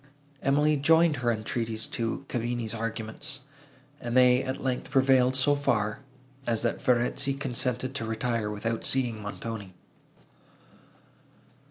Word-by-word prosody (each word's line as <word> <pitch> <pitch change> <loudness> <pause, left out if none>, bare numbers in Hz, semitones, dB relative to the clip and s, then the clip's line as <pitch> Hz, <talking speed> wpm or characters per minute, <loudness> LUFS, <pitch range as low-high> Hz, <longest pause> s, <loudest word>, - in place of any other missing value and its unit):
Emily 150 +2 +3
joined 160 +1 +4
her 120 -1 +1
entreaties 110 0 -2
to 115 +4 -3
Cavigni's 120 -2 -2
arguments, 115 +5 -4 0.6
and 120 +1 -1
they, 125 0 +6
at 130 - -3
length, 130 -2 -2
prevailed 130 -1 +4
so 145 +3 +4
far, 110 -7 0 0.5
as 115 -1 +1
that 120 - -1
Verezzi 130 +3 +2
consented 130 -1 -1
to 125 -5 -3
retire, 110 -1 -1
without 110 +2 -3
seeing 120 -5 +1
Montoni. 105 -2 -6
120 Hz, 120 wpm, -28 LUFS, 115-135 Hz, 0.6 s, they